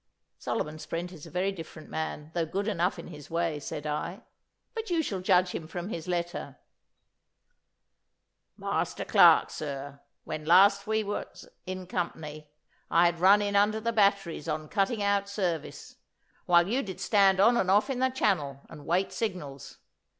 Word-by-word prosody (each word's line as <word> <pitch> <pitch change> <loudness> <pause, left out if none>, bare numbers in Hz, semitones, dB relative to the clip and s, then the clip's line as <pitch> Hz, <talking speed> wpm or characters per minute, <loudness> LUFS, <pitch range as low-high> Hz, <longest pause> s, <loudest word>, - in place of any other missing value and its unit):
'Solomon 155 +1 -3
Sprent 170 +3 -5
is 160 -5 -11
a - - -11
very 185 +2 0
different 160 -4 -10
man, 160 -1 -5
though 170 - 0
good 195 +6 -2
enough 180 -3 0
in - - -9
his 150 -4 -11
way,' 165 -2 -1
said 150 +1 -6
I. 160 +7 -4 0.5
'But 450 -2 -5
you 335 -2 +1
shall 195 -9 -3
judge 185 -1 +3
him 160 - -5
from 175 +3 -5
his 165 -6 -5
letter.' 175 -5 -3 2.0
'"Master - - -2
Clarke. - - +6
Sir, 140 -1 -6 0.2
When 155 - -5
last 195 +5 +5
we 220 0 +1
was 205 - -6 0.2
in 185 0 -5
company 155 -4 -5 0.4
I 170 +2 +5
had 170 -1 +1
run 200 +3 +6
in 200 0 -1
under 210 +2 +3
the 230 +1 -2
batteries 200 -7 +1
on 155 -1 -3
cutting 205 +1 0
out 200 0 +1
service, 180 -6 -4 0.5
while 175 0 +5
you 250 +6 +1
did 190 -5 -7
stand 195 0 +4
on 230 +5 +6
and 190 -6 +1
off 205 +5 +4
in 255 - -3
the 260 0 +3
channel 155 - 0
and 150 -3 -11
wait 180 +4 +1
signals. 175 -11 -5
180 Hz, 165 wpm, -28 LUFS, 160-200 Hz, 2.0 s, Clarke